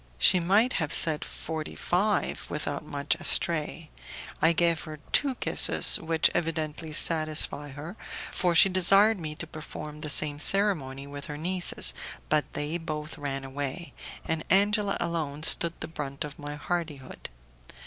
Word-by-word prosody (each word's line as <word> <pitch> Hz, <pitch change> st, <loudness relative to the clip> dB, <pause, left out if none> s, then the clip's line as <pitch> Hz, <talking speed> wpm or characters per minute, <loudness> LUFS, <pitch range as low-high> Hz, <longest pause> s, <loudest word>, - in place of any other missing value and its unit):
She 180 Hz, -, +4 dB
might 200 Hz, +8 st, +2 dB
have 155 Hz, -1 st, -3 dB
said 155 Hz, -2 st, +3 dB
forty 160 Hz, -1 st, -7 dB
five 200 Hz, +3 st, -1 dB
without 145 Hz, -1 st, -4 dB
going 150 Hz, -, -16 dB
much 140 Hz, 0 st, -1 dB
astray. 165 Hz, -1 st, +2 dB, 0.5 s
I 160 Hz, -, +4 dB
gave 170 Hz, -1 st, 0 dB
her 155 Hz, -1 st, -9 dB
two 275 Hz, -3 st, +3 dB
kisses, -, -, +3 dB
which 160 Hz, -1 st, +1 dB
evidently 160 Hz, -1 st, -4 dB
satisfied 155 Hz, -2 st, +3 dB
her, 155 Hz, +7 st, -9 dB, 0.4 s
for 175 Hz, -2 st, -1 dB
she 180 Hz, -, +8 dB
desired 195 Hz, +3 st, +4 dB
me 155 Hz, -2 st, -7 dB
to 170 Hz, -, -5 dB
perform 155 Hz, -1 st, -9 dB
the 150 Hz, -, -4 dB
same 145 Hz, 0 st, +3 dB
ceremony 155 Hz, -9 st, +2 dB
with 140 Hz, 0 st, -9 dB
her 150 Hz, -1 st, -7 dB
nieces, 180 Hz, +3 st, +2 dB, 0.4 s
but 150 Hz, -3 st, 0 dB
they 150 Hz, +4 st, -4 dB
both 155 Hz, -1 st, -7 dB
ran 135 Hz, -2 st, -4 dB
away, 140 Hz, +5 st, -6 dB, 0.3 s
and 160 Hz, 0 st, -3 dB
Angela 205 Hz, +2 st, +2 dB
alone 155 Hz, -3 st, -4 dB
stood 170 Hz, +1 st, +3 dB
the 160 Hz, -, -4 dB
brunt 145 Hz, -4 st, -6 dB
of 150 Hz, 0 st, -10 dB
my 145 Hz, 0 st, -7 dB
hardihood. 150 Hz, -4 st, -6 dB
160 Hz, 150 wpm, -26 LUFS, 150-175 Hz, 0.5 s, she